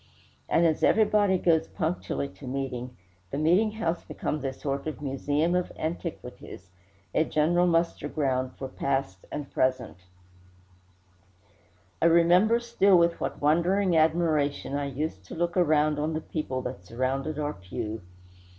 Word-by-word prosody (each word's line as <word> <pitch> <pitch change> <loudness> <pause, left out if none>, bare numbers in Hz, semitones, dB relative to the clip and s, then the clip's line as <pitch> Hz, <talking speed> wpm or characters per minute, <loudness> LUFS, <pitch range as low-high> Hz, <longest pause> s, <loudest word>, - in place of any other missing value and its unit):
And 170 - +3
as 160 -2 +1
everybody 210 -3 +4
goes 165 -2 +2
punctually 165 -4 -2
to 140 - -12
meeting, 125 -2 -4 0.3
the - - -4
meeting 180 +8 +3
house 175 -6 -2
becomes 150 -2 -4
a 135 - -1
sort 140 +2 -4
of 155 - -4
museum 145 +4 0
of 180 0 0
antiquities 155 - -6 0.4
a - - +3
general 170 +3 +2
muster 170 0 +1
ground 130 -4 -1
for 135 - -5
past 135 -7 -2
and 145 -2 -5
present. 130 -5 0 2.0
I - - +5
remember 175 +7 +5
still 215 -5 +3
with 170 0 +2
what - - -4
wondering 175 +5 +3
admiration 155 -3 +1
I 145 0 -1
used 140 -7 -4
to - - -9
look 175 +1 -1
around 155 -4 +3
on 155 +2 -1
the 155 - -2
people 130 -6 -4
that 125 -7 -6
surrounded 130 +8 -2
our 150 0 -2
pew. 105 +4 -6
155 Hz, 140 wpm, -27 LUFS, 135-170 Hz, 2.0 s, I